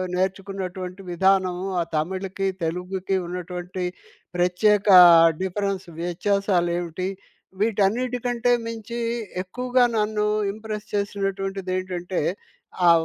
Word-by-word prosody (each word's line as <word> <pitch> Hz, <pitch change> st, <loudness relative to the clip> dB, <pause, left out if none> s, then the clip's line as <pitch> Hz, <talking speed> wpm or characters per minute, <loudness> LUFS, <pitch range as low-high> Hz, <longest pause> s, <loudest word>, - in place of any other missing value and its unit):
నేర్చుకున్నటువంటి 190 Hz, 0 st, -3 dB
విధానము, 185 Hz, 0 st, +2 dB
ఆ -, -, +1 dB
తమిళ్‌కి, 190 Hz, +4 st, -2 dB, 0.2 s
తెలుగుకి 180 Hz, +3 st, -2 dB
ఉన్నటువంటి 180 Hz, +1 st, -5 dB, 0.5 s
ప్రత్యేకా 190 Hz, +2 st, +5 dB, 0.4 s
డిఫరెన్స్ 195 Hz, -1 st, -2 dB
వ్యత్యాసాలేమిటిి. 175 Hz, -1 st, 0 dB, 0.5 s
వీటన్నిటి 225 Hz, +4 st, +1 dB
కంటే 245 Hz, 0 st, +1 dB
మించి, 230 Hz, +1 st, -5 dB, 0.4 s
ఎక్కువగా 250 Hz, +6 st, +1 dB
నన్ను 210 Hz, 0 st, +1 dB, 0.3 s
ఇంప్రెస్ 215 Hz, -1 st, -6 dB
చేసినటువంటిదేంటంటే, 195 Hz, -3 st, -2 dB, 0.6 s
ఆ 170 Hz, -, +8 dB
190 Hz, 80 wpm, -24 LUFS, 180-205 Hz, 0.6 s, ఆ